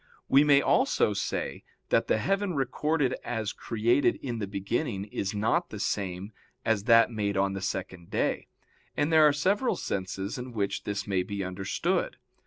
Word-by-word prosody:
We 140 +2 +6
may 145 -1 +5
also 260 - +2
say 100 - -3 0.3
that - - +2
the - - +2
heaven 195 - 0
recorded 135 +1 0
as 110 -3 -3
created 115 +4 +1
in 120 -4 -5
the 100 - -3
beginning 100 +2 -2
is 100 -1 -4
not 105 +2 +1
the - - -7
same 95 +1 -2 0.3
as 110 -3 +1
that 115 0 +6
made 100 -3 -1
on 95 0 +1
the 95 - -4
second 95 -3 -4
day; - - -1 0.5
and 145 +2 +1
there 155 -1 +7
are - - +5
several 195 - +1
senses 95 +3 -4
in 125 0 -7
which 100 -3 -2
this 100 -1 -3
may 95 -3 0
be 100 +1 -4
understood. 95 +1 -2
110 Hz, 170 wpm, -28 LUFS, 100-140 Hz, 0.5 s, there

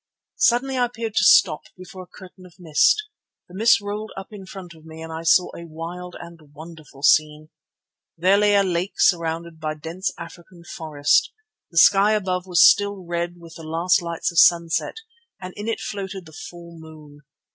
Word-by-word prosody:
Suddenly 255 +2 +1
I 245 - +3
appeared 230 -2 -6
to - - +1
stop 185 - +4
before 185 +1 -11
a 180 - -13
curtain 185 0 -15
of 175 - -21
mist. 175 - +2 0.4
The 175 - -18
mist 225 +3 +3
rolled 205 +2 -6
up 195 - -8
in 195 -3 -11
front 185 -3 -10
of 160 -1 -19
me 160 0 -12
and 160 0 -8
I 160 - -6
saw 180 +2 +3
a 170 - -10
wild 170 +3 -8
and 170 -1 -12 0.2
wonderful 155 -3 -13
scene. 155 +1 +2 0.7
There 185 +4 +3
lay 205 0 +3
a 200 - +4
lake 180 +1 -2
surrounded 165 -1 0
by 155 -1 -4
dense 165 +5 -5
African 170 +1 -12
forest. 150 -4 0 0.4
The 170 - -11
sky 200 +5 +5
above 185 -3 -2
was 180 -1 +6
still 200 -3 +1
red 170 0 -4
with 165 -1 -14
the 165 - -11
last 165 +4 +1
lights 170 0 -3
of 170 - +2
sunset 170 -1 +3 0.4
and 185 0 -9
in 205 +1 -7
it 225 - -2
floated 195 -2 -6
the 160 - -15
full 170 +1 -11
moon. 155 -2 -14
175 Hz, 185 wpm, -22 LUFS, 165-195 Hz, 0.7 s, was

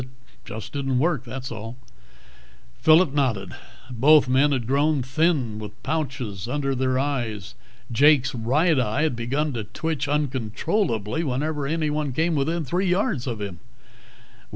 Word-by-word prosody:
"It 125 - -8 0.4
just 110 0 -8
didn't 135 -3 -1
work, 145 -3 0
was 130 +1 -6
all." 115 +2 -7 1.0
Phillip 160 -1 +5
nodded. 120 -10 -1 0.4
Both 140 +4 +5
men 135 +3 +3
had 130 -4 -1
grown 140 +2 +2
thin, 130 -5 0
with 105 -1 -7
pouches 125 - -3
under 135 +1 -1
their 130 0 0
eyes. 120 -8 -2 0.4
Jake's 135 +1 +4
right 135 +7 +2
eye 125 +4 0
had 155 -6 +1
begun 140 +6 -1
to 115 -3 -3
twitch 155 -1 -3
uncontrollably 130 - -1
whenever 145 +1 -2
anyone 150 -2 -1
came 165 +5 +1
within 160 +3 0
three 180 +8 0
yards 180 - 0
of 115 -4 -3
him. 95 -4 -5
135 Hz, 140 wpm, -24 LUFS, 120-155 Hz, 1.0 s, Phillip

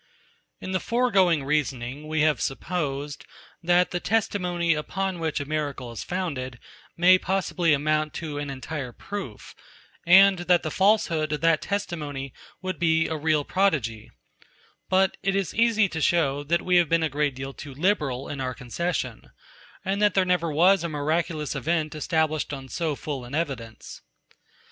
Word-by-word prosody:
92. - - -8
In - - -4
the 185 - +1
foregoing 195 - +2
reasoning 140 -1 -2
we 155 0 0
have 150 -2 +2
supposed, 145 -1 -3 0.4
that 175 +1 +3
the 180 - -1
testimony, 180 -5 0
upon 190 +4 -3
which 160 -2 -1
a 145 - -4
miracle 145 -5 -3
is 115 - -6
founded, 140 -9 -4 0.4
may 185 +2 +6
possibly 180 -3 0
amount 155 +1 +1
to 150 -3 -4
an 145 -1 -4
entire 135 -1 -5
proof, 190 - -7 0.5
and 190 +2 +7
that 175 0 +2
the 155 - -3
falsehood 180 -6 +2
of 150 - -2
that 165 -1 +3
testimony 150 -9 -4 0.3
would 185 0 -3
be 160 -1 +3
a 160 - -2
real 155 -1 +1
prodigy: 140 - 0 0.8
But 190 0 +2
it 195 0 0
is 195 -4 -1
easy 225 -2 +3
to 160 - -4
shew, 145 -4 +2
that 170 +3 +1
we 180 -1 +3
have 170 -4 +3
been 165 0 +3
a - - +2
great 145 -1 -1
deal 135 +1 -6
too 140 -1 -10
liberal 150 -6 0
in 140 -2 -5
our 130 -1 -3
concession, 155 +8 -3 0.6
and 195 +2 -1
that 210 -2 +3
there 190 -1 +4
never 180 -3 +1
was 175 +4 +4
a 170 - -2
miraculous 155 +1 -1
event 155 +2 -1
established 155 -1 0
on 135 -2 -7
so 160 -1 -2
full 140 -3 -5
an 125 +4 -6
evidence. 135 -9 -5
160 Hz, 165 wpm, -25 LUFS, 145-180 Hz, 0.8 s, and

